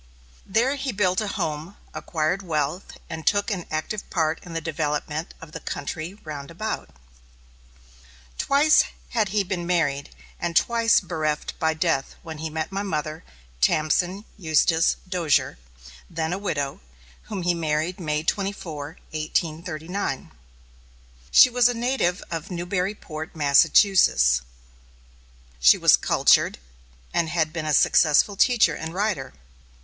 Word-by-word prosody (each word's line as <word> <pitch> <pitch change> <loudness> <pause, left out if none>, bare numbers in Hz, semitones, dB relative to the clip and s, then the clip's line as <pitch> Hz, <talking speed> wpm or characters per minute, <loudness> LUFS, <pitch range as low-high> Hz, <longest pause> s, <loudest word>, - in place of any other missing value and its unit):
There 240 +8 +1
he 270 -1 -2
built 185 -3 +1
a 215 - -2
home, 170 -2 -4 0.2
acquired 165 +3 -1
wealth, 160 0 -3
and 160 - -6
took 205 +2 +2
an 185 -4 -4
active 155 +7 -4
part 160 -2 0
in 170 - -10
the 165 - -1
development 155 0 -3
of 165 -1 -12
the - - -7
country 160 +5 -5
round 145 -3 -7
about. 215 +7 -4 1.5
Twice 295 +3 +4 0.2
had 220 -4 0
he 205 +1 +1
been 180 -2 -4
married, 145 -5 0 0.3
and 170 -1 -3
twice 230 +4 +3
bereft 155 -5 -2
by 160 0 +1
death 160 -4 0
when 160 -2 -8
he 160 0 -4
met 160 +3 -4
my 195 +1 -2
mother, 155 -4 -3 0.4
Tamsen 175 - +1
Eustis 160 0 +3
Dozier, 170 - +1 0.5
then 165 0 -2
a 190 - -3
widow, 145 -9 -2 0.5
whom 195 -4 -5
he 175 0 +2
married 160 +2 -1
May 150 -3 -2
24, 165 -5 -3
1839. 160 +1 -3 1.0
She 250 - +7
was 245 0 +4
a 245 - -2
native 235 -7 0
of 165 +1 -4
Newburyport, 180 -3 -4
Massachusetts. 145 - +4 1.2
She 60 - +7
was - - +6
cultured, - - +3 0.6
and 165 -1 +1
had 160 -2 0
been 160 -2 -4
a 155 - +1
successful 155 +10 +4
teacher 240 +3 +4
and 160 +1 -6
writer. 190 -10 -1
165 Hz, 130 wpm, -24 LUFS, 155-195 Hz, 1.5 s, She